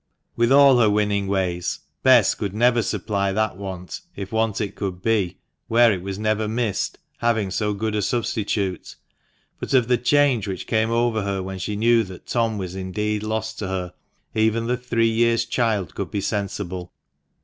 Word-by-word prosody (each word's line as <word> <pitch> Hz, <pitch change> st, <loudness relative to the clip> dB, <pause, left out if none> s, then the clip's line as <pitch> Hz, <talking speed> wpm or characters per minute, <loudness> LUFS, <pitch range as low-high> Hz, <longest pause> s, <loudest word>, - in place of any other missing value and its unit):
With 120 Hz, +1 st, +2 dB
all 140 Hz, -2 st, +7 dB
her 110 Hz, -3 st, +5 dB
winning 105 Hz, -1 st, +1 dB
ways, 90 Hz, -3 st, -1 dB, 0.2 s
Bess 125 Hz, -6 st, +6 dB
could 100 Hz, -1 st, -4 dB
never 120 Hz, +1 st, +3 dB
supply 100 Hz, -3 st, -1 dB
that 110 Hz, -2 st, 0 dB
want, 95 Hz, -3 st, -7 dB
if 100 Hz, -1 st, -6 dB
want 110 Hz, -2 st, 0 dB
it 105 Hz, -2 st, -2 dB
could 95 Hz, -3 st, -4 dB
be, 105 Hz, -6 st, +1 dB, 0.3 s
where 115 Hz, 0 st, +5 dB
it 90 Hz, -, -4 dB
was 95 Hz, +1 st, -5 dB
never 110 Hz, 0 st, 0 dB
missed, 110 Hz, -2 st, -1 dB, 0.2 s
having 110 Hz, -5 st, +1 dB
so 105 Hz, +1 st, -1 dB
good 110 Hz, +1 st, -2 dB
a 105 Hz, -, 0 dB
substitute. 105 Hz, -4 st, -2 dB, 0.6 s
But -, -, -1 dB
of 125 Hz, -3 st, +4 dB
the 125 Hz, -1 st, +2 dB
change 135 Hz, -4 st, +3 dB
which 95 Hz, -2 st, -4 dB
came 110 Hz, 0 st, +1 dB
over 115 Hz, -1 st, +1 dB
her 100 Hz, -1 st, -2 dB
when 95 Hz, 0 st, -6 dB
she 105 Hz, +2 st, -3 dB
knew 115 Hz, +2 st, +4 dB
that 95 Hz, -2 st, -11 dB
Tom 115 Hz, -3 st, 0 dB
was 95 Hz, -2 st, -5 dB
indeed 105 Hz, +3 st, -2 dB
lost 110 Hz, +1 st, -3 dB
to 105 Hz, -, -3 dB
her, 90 Hz, -2 st, -3 dB, 0.4 s
even 110 Hz, +1 st, +1 dB
the 125 Hz, +1 st, +1 dB
three 120 Hz, -2 st, 0 dB
years' 115 Hz, 0 st, +2 dB
child 115 Hz, -6 st, 0 dB
could -, -, -4 dB
be 100 Hz, -, -2 dB
sensible. 95 Hz, -3 st, -3 dB
110 Hz, 180 wpm, -23 LUFS, 95-115 Hz, 0.6 s, all